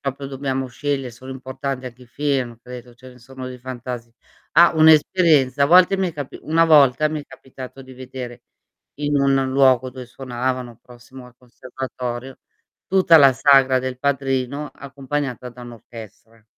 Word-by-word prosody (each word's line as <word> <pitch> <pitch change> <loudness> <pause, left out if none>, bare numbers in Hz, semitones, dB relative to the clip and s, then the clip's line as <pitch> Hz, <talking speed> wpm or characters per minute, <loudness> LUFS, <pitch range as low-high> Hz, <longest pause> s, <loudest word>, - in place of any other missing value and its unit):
proprio 140 0 -5
dobbiamo 135 -1 -3
sceglie 135 0 -3
sono 130 +3 -12
importanti 130 0 -6
anche 125 0 -11
i - - -16
film, 130 -3 -2
credo, 125 -1 -11
ce 130 +2 -15
ne 125 - -17
sono 130 +1 -10
dei 125 - -9
fantasi 125 -2 -7 0.4
ah, 170 +2 +6
un'esperienza: 155 -3 +4
a - - +2
volte 180 +4 +5
mi 190 - 0
è - - -16
capi 145 -3 -7
una 165 +2 +2
volta 150 -3 +5
mi 155 -1 -4
è - - -13
capitato 130 0 -11
di 130 0 -14
vedere 125 -1 -9 0.5
in 145 0 -1
un 135 -1 +2
luogo 130 -1 +3
dove 125 0 -10
suonavano 125 -1 -5
prossimo 125 +1 -14
al 125 - -20
conservatorio, 125 0 -7 0.5
tutta 185 -3 +4
la 135 -2 +7
sagra 130 0 +4
del 130 0 -5
padrino 135 +1 -2
accompagnata 140 -2 -5
da 125 +1 -14
un'orchestra. 115 -1 -13
130 Hz, 160 wpm, -21 LUFS, 125-140 Hz, 0.5 s, la